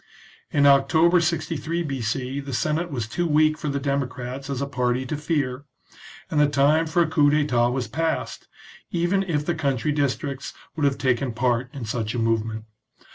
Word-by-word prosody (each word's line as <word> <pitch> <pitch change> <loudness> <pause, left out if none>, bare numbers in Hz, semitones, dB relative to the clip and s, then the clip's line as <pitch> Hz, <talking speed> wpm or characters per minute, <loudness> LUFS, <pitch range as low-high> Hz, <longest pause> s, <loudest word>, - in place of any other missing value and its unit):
In 145 -1 +2
October 160 +6 +5
63 165 0 -1
B.C., 130 -1 -2
the 140 -2 -5
Senate 155 +6 0
was 125 -7 -3
too 175 +9 -1
weak 155 0 +3
for 155 - -6
the 140 0 -1
democrats 135 -1 -3
as 135 -2 -2
a 140 - -1
party 125 -1 -1
to 140 - -3
fear, 145 -3 -2 0.7
and 155 - +1
the 150 - +5
time 145 +3 +3
for 170 +2 +3
a - - -1
coup 150 -2 +3
d'etat 145 -5 +2
was 125 -1 -2
past, 160 +8 -2 0.4
even 175 +3 +1
if 155 -6 -1
the 175 - 0
country 145 -2 0
districts 140 -1 -2 0.2
would 150 -3 0
have 140 -1 +2
taken 130 -1 0
part 120 +1 0
in 135 -6 -6
such 110 0 -3
a - - -1
movement. 110 -1 -1
140 Hz, 180 wpm, -24 LUFS, 125-155 Hz, 0.7 s, October